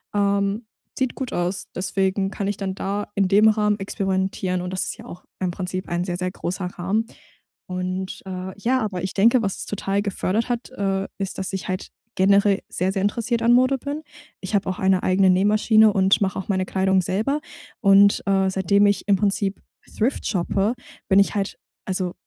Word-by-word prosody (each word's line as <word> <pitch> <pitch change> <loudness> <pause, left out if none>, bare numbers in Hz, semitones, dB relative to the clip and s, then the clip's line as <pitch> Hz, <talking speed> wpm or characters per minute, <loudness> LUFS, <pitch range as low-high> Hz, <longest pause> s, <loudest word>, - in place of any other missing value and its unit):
Ähm, 200 +2 +1 0.3
sieht 260 -2 -1
gut 260 -2 -4
aus, 175 +1 -2
deswegen 195 +1 0
kann 200 -1 -4
ich 205 - -3
dann 190 -1 -3
da 200 +2 -3
in 195 -2 +2
dem 210 +2 +6
Rahmen 210 -1 +2
experimentieren 190 -2 -1
und 180 0 -5
das 185 - 0
ist - - -5
ja - - -12
auch 180 - -10 0.2
im 185 -1 -1
Prinzip 185 0 -4
ein 175 0 -1
sehr, 175 -1 -3
sehr 185 0 -2
großer 185 0 -4
Rahmen. 190 +5 -1 0.6
Und, 185 +1 -4
äh, 185 0 -5
ja, 255 +3 +1
aber 200 -4 -3
ich 190 - -3
denke, 230 +5 +4
was 195 -3 -2
es - - -5
total 200 0 -1
gefördert 205 +3 -1
hat, 240 0 -2
äh, 195 -4 -1
ist, 195 -1 -4
dass 190 0 -4
ich 190 - -4
halt 185 +1 -3 0.3
generell 200 +1 +4
sehr, 185 +2 -1
sehr 195 0 -2
interessiert 230 +3 0
an 235 +1 +4
Mode 255 +2 +4
bin. 285 +4 -5 0.4
Ich 190 - -6
habe 195 -1 +1
auch 185 - -3
eine 190 -1 +2
eigene 185 0 +3
Nähmaschine 215 +3 +4
und 195 -1 +3
mache 190 -1 0
auch 190 - -7
meine 185 -1 +1
Kleidung 190 0 +2
selber 220 - -1 0.4
und, 200 0 +6
äh, 195 -1 +3
seitdem 195 +2 +3
ich 200 0 0
im 200 - +5
Prinzip 200 0 -1 0.4
thrift 245 +6 0
shoppe, 195 +4 0 0.3
bin 190 - +4
ich 200 - +3
halt 200 -1 -2 0.3
also, 185 -2 -2
195 Hz, 195 wpm, -23 LUFS, 185-205 Hz, 0.6 s, dem